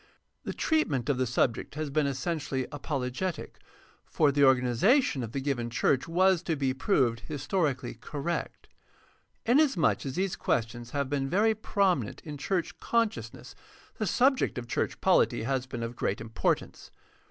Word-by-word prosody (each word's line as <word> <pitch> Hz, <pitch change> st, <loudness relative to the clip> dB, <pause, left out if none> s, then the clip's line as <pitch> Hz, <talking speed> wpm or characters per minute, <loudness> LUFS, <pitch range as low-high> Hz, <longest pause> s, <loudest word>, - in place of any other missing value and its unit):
The -, -, -3 dB
treatment 150 Hz, -, 0 dB
of 135 Hz, -3 st, +1 dB
the 130 Hz, -, +1 dB
subject 120 Hz, +2 st, 0 dB
has 155 Hz, -2 st, -3 dB
been 150 Hz, 0 st, +2 dB
essentially 135 Hz, -1 st, -2 dB
apologetic, 145 Hz, +4 st, -4 dB, 0.4 s
for 145 Hz, -2 st, +2 dB
the 145 Hz, +1 st, +1 dB
organi 130 Hz, -2 st, +5 dB
zation 195 Hz, -, +3 dB
of 115 Hz, -2 st, -5 dB
the 135 Hz, -, -2 dB
given 130 Hz, -4 st, -2 dB
church 130 Hz, +4 st, +1 dB
was 185 Hz, +1 st, +3 dB
to 165 Hz, -, -1 dB
be 135 Hz, -2 st, 0 dB
proved 130 Hz, -, +1 dB
historically 145 Hz, -2 st, -2 dB
correct. 145 Hz, +8 st, -5 dB, 0.8 s
Inasmuch 260 Hz, -, +3 dB
as 135 Hz, -, -4 dB
these 190 Hz, 0 st, -1 dB
questions 120 Hz, +1 st, -2 dB
have 140 Hz, +1 st, -1 dB
been 135 Hz, 0 st, -1 dB
very 215 Hz, +6 st, +3 dB
prominent 195 Hz, -, 0 dB
in 150 Hz, -2 st, -8 dB
church 180 Hz, +3 st, -2 dB
consciousness 230 Hz, -2 st, -2 dB, 0.5 s
the 215 Hz, -, 0 dB
subject 260 Hz, -, +2 dB
of 125 Hz, -, -4 dB
church -, -, -2 dB
poHty -, -, +3 dB
has 130 Hz, 0 st, -1 dB
been 120 Hz, -2 st, -5 dB
of 115 Hz, +1 st, -5 dB
great 100 Hz, -, -1 dB
importance. 110 Hz, 0 st, -2 dB
140 Hz, 155 wpm, -29 LUFS, 125-180 Hz, 0.8 s, organi